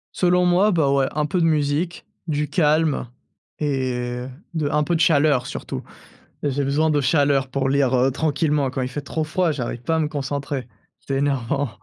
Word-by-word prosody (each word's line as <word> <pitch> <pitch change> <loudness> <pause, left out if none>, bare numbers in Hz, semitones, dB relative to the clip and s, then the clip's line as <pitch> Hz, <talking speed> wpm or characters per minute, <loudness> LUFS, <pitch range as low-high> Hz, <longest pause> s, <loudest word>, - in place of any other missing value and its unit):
Selon 180 0 +3
moi, 185 +4 +4
bah, 150 -6 +2
ouais, 135 -1 +2
un 150 0 0
peu 175 +3 0
de - - +3
musique, 155 +2 0 0.2
du 150 -1 -1
calme 150 -2 +2 0.5
et 135 -4 0
heu, 125 +1 -4 0.2
de 155 -3 -1
un 150 0 +2
peu 175 - 0
de 160 - 0
chaleur 145 -4 +3
surtout. - - -5 0.6
J'ai 140 0 0
besoin 145 +4 +1
de 150 -1 +2
chaleur 140 -1 +2
pour 135 0 -1
lire, 135 -1 +2
heu, 130 +2 +3
tranquillement. 145 -1 0
Quand 130 - -4
il 125 - -2
fait 140 +3 -5
trop 155 +3 -2
froid, 170 +3 0
j'arrive 120 -3 -4
pas 160 +6 0
à - - +1
me 155 - +1
concentrer, 140 -3 -4 0.3
c'est 135 - -3
énervant. 140 0 0
145 Hz, 195 wpm, -22 LUFS, 135-155 Hz, 0.6 s, moi